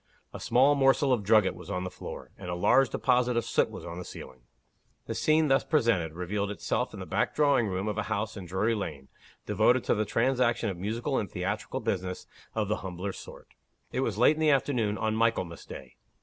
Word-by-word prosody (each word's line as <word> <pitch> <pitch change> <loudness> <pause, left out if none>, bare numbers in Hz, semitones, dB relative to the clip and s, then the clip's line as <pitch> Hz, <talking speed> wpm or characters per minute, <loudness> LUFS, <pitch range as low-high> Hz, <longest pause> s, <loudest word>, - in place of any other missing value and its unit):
A - - -7
small 130 +5 +4
morsel 135 -1 +3
of 120 - +1
drugget 105 -1 +4
was - - -12
on 90 -2 -2
the 90 - -5
floor; 90 - -9
and 90 - -8
a 90 - -2
large 125 +9 +4
deposit 125 -1 +1
of 120 - 0
soot - - +1
was - - -9
on 85 +1 -6
the - - -5
ceiling. 65 -6 -10 0.6
The - - -4
scene 155 0 +2
thus 135 -1 +3
presented, 115 - +1
revealed 100 +4 -2
itself 105 - -2
in - - -8
the - - -6
back - - -1
drawing 140 -6 +3
room 95 +1 -2
of 105 0 -2
a 105 - -3
house 110 0 -2
in 95 -4 -8
Drury 95 +6 0
Lane, 75 -10 -5 0.4
devoted 110 +4 +3
to - - +2
the 110 - +1
transaction 120 -2 +1
of 90 - -7
musical 115 +8 -2
and 100 - -4
theatrical 105 +9 -3
business 95 -5 -3 0.3
of 110 -2 0
the 105 - 0
humbler 95 +1 -5
sort. - - -11 0.4
It - - -2
was - - -1
late 155 - +5
in - - -3
the 155 - +4
afternoon, 125 -7 +1
on 110 0 -1
Michaelmas 110 -7 0
day. 65 -2 -10
110 Hz, 215 wpm, -28 LUFS, 95-125 Hz, 0.6 s, late